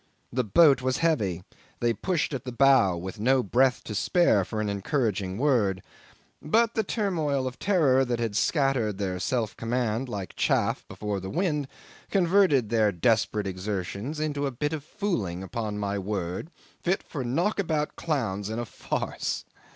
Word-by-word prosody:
The 125 +1 +1
boat 135 - +5
was 130 0 0
heavy; 100 - +1 0.4
they 120 -1 +2
pushed 175 +2 -1
at 130 - -3
the 125 - -5
bow 125 -8 +4
with 95 +4 -6
no 130 +3 +3
breath 125 +5 +2
to 110 - -6
spare 105 - +3
for 110 +4 -4
an 110 - -1
encouraging 100 -2 -1
word: 110 -9 +2 0.6
but 230 +8 +2
the 220 - +1
turmoil 165 - -1
of 130 -1 -5
terror 150 -10 +3
that 120 -1 -1
had 115 -3 -2
scattered 130 - +1
their 95 -2 -2
self 115 0 -1
command 120 +1 -1
like 100 -6 -5
chaff - - +1
before 105 -2 -4
the 95 0 -6
wind, 155 - 0 0.4
converted 180 - +3
their 110 -3 +3
desperate 105 +2 +1
exertions 100 - -4
into 145 -2 -1
a - - -3
bit 150 +5 -2
of 155 -3 -4
fooling, 120 - -3
upon 105 +1 -4
my 100 -1 -2
word, 95 - -3 0.3
fit 185 +2 0
for 140 -5 -5
knockabout 160 - 0
clowns 110 - -2
in 110 - -3
a 120 - -2
farce. - - -3
120 Hz, 160 wpm, -27 LUFS, 100-150 Hz, 0.6 s, boat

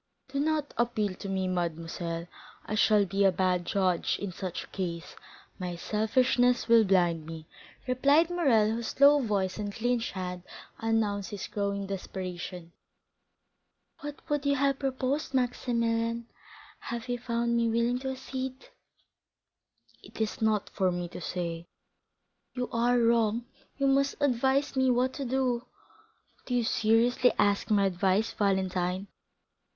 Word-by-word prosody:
"Do 275 +1 -2
not 300 0 0
appeal 215 -4 +1
to 195 +2 -7
me, 190 -1 -1
mademoiselle; 170 -1 -3 0.4
I - - -4
shall 215 -1 +4
be 195 +2 0
a 195 - +6
bad 180 -1 0
judge 185 -3 +1
in 200 -2 -4
such 180 0 -5
a - - -14
case; 170 -3 -5 0.4
my 180 -1 -4
selfishness 245 +6 +2
will 230 -1 +7
blind 175 -5 +2
me," 160 -1 -8 0.4
replied 280 +7 +3
Morrel, 245 -12 +3
whose 230 +3 -4
low 285 +1 +7
voice 200 -4 -1
and 205 -1 -3
clenched 235 +2 -1
hands 180 -2 -5 0.4
announced 215 -3 0
his 205 - -5
growing 200 -1 -2
desperation. 180 -2 -6 1.3
"What 290 0 -8
would 295 -1 0
you 280 0 +2
have 275 0 +1
proposed, 270 +1 -2
Maximilian, 235 -2 0 0.5
had 235 0 -5
you 245 0 -2
found 235 -1 -1
me 230 -1 +2
willing 235 +2 +1
to 265 +1 -4
accede?" 260 0 -6 1.3
"It - - -13
is 220 0 -2
not 215 -2 +1
for 185 -1 +1
me 175 -1 -3
to - - -8
say." 170 -1 -4 0.9
"You 250 -1 -2
are 240 +1 +2
wrong; 230 -1 +2 0.3
you 275 - 0
must 275 +1 +3
advise 270 +1 +1
me 260 -1 +3
what 250 +1 +2
to 275 - -4
do." 250 -1 0 0.8
"Do 250 - -1
you 240 - +2
seriously 230 +3 +3
ask 205 +1 +2
my 205 -2 +4
advice, 190 +3 +1
Valentine?" 190 -2 0
225 Hz, 140 wpm, -29 LUFS, 190-255 Hz, 1.3 s, will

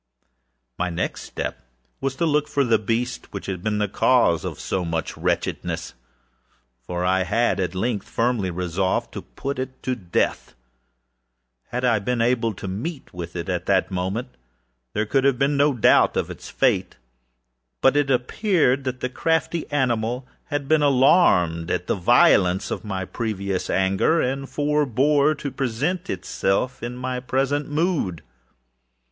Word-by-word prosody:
â - - -57 0.8
My 90 0 0
next 90 +1 -3
step 65 - -5 0.4
was 135 0 -2
to 170 - 0
look 150 -1 +2
for 145 -1 +1
the 115 -4 +3
beast 115 +4 -2
which 100 - -6
had 95 -2 -4
been 105 +1 -1
the 105 0 +1
cause - - +3
of - - -5
so 95 - -2
much 80 -2 -3
wretchedness; - - -2 0.9
for 90 +7 -3
I 95 +1 +2
had, 115 +5 +1
at 90 -1 -2
length, 105 +1 -2
firmly 115 -5 0
resolved 90 +1 -1
to - - -5
put 140 0 -5
it 130 0 -6
to 130 - 0
death. 90 - -2 1.1
Had 125 +1 -2
I 115 -3 +3
been 120 +4 -1
able 115 -2 +1
to 95 - -7
meet 130 - -5
with 85 -1 -7
it, 85 -1 -4
at 90 -2 -2
the 95 -2 +4
moment, 95 +6 -2 0.6
there 105 +1 0
could 135 +5 +1
have 135 -2 +3
been 140 +2 +2
no 145 +1 +4
doubt 120 -6 +4
of - - -1
its - - -9
fate; - - +1 0.8
but 135 - +4
it 145 -1 +2
appeared 135 - +2
that 130 0 -3
the - - 0
crafty 160 +4 -1
animal 125 -2 0 0.2
had 145 -2 -3
been 155 0 +4
alarmed 125 - +4
at 90 0 -1
the - - 0
violence 90 0 +4
of - - -3
my 95 -3 -3
previous 100 -3 -3
anger, 95 - +2
and 135 +2 -1
forebore 145 0 +2
to 140 -1 -5
present 140 +9 -2
itself 95 +5 -1
in 120 +1 -5
my 125 0 -3
present 135 +3 -1
mood. 150 - -1
120 Hz, 160 wpm, -23 LUFS, 95-140 Hz, 1.1 s, the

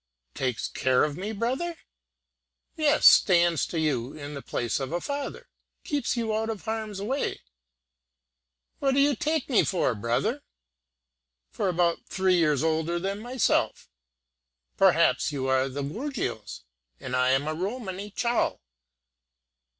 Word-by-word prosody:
"Takes 130 -4 -2
care 130 -1 +2
of 150 -1 -1
me, 195 +6 -4
brother!" 260 +11 -2 1.0
"Yes, 305 -1 +2
stands 175 -4 +6
to 165 - -3
you 140 -5 -1
in 145 -1 -8
the 140 - -6
place 120 -1 -2
of 135 0 -4
a 175 - -1
father 280 +6 -5 0.4
keeps 285 -4 -1
you 225 -2 -1
out 220 +1 -1
of 220 -3 -5
harm's 220 -2 -3
way." 255 +8 -2 1.4
"What 270 -1 +1
do - - +3
you 285 0 +4
take 305 +4 -1
me 250 -6 +4
for, 175 -9 +1
brother?" 120 - -1 1.1
"For 185 - -1
about 170 -1 +1
three 185 -1 +2
years 150 -5 +2
older 160 +1 0
than 195 +3 -3
myself." 245 +2 0 0.9
"Perhaps; - - +4
but - - -2
you 135 -2 -2
are 130 0 +3
of 135 -1 -7
the 140 - -2
gorgios, 160 - -4 0.4
and 130 -1 -4
I 125 0 +3
am 135 +3 +2
a 155 - -1
Romany 195 +2 -4
Chal. 235 +3 0
185 Hz, 145 wpm, -27 LUFS, 145-235 Hz, 1.4 s, stands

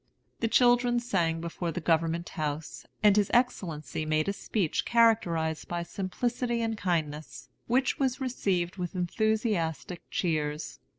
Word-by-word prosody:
The 230 - +1
children 245 +1 +4
sang 170 -9 0
before 170 0 -3
the 180 - -3
Government 165 +1 +1
House, 155 -1 -4 0.2
and 205 -2 +6
his 205 -2 +3
Excellency 160 - 0
made 155 +1 +1
a 200 - +1
speech 195 -4 -1
characterized 175 -9 +2
by 175 0 -2
simplicity 235 +6 -2
and 225 -1 -1
kindness, 160 -6 -3 0.2
which 255 +2 +1
was 265 -1 +1
received 195 -9 -1
with 180 0 -4
enthusiastic 180 - -1
cheers. 155 -3 -2
180 Hz, 130 wpm, -29 LUFS, 160-230 Hz, 0.2 s, and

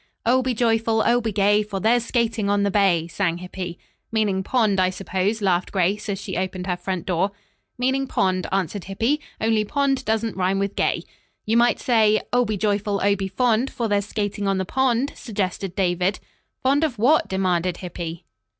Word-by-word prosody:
"'Oh, 255 +3 +4
be 255 -1 -1
joyful, 225 -1 +2
oh, 240 +1 +3
be 225 -1 -2
gay, 205 +1 +3
For 205 -2 -4
there's 230 +4 +3
skating 230 -4 0
on 205 0 +2
the 200 - +1
bay,'" 185 -5 +2
sang 170 -1 -1
Hippy. 180 -1 -6 0.3
"Meaning 210 -4 +1
pond, 215 -2 +1
I 185 0 +3
suppose," 195 +3 -2
laughed 180 -2 +1
Grace, 195 +3 0
as 195 -1 -2
she 190 -2 -5
opened 185 0 -3
her 180 -2 -1
front 180 -1 -4
door. 185 +2 +1 0.5
"Meaning 265 +2 0
pond?" 185 -5 0
answered 190 0 -2
Hippy, 230 +10 0 0.2
"only 220 -1 +2
pond 270 +3 0
doesn't 220 -1 -1
rhyme 190 +1 +1
with 200 0 -2
gay." - - 0 0.4
"You 220 - +1
might 240 +1 +4
say, 220 -3 +3
"'Oh, 245 0 +4
be 215 -2 -2
joyful, 205 0 0
oh, 200 0 +4
be 195 -1 -3
fond, 235 +5 +1
For 235 -3 -2
there's 205 -1 0
skating 205 -1 -2
on 195 -1 +1
the 190 - -1
pond,'" 265 +3 +1
suggested 195 -4 -3
David. 180 +1 0 0.4
"Fond 275 +4 +3
of 285 -7 -1
what?" 270 +9 +3
demanded 180 -2 0
Hippy. 170 -2 -6
205 Hz, 185 wpm, -23 LUFS, 190-230 Hz, 0.5 s, Oh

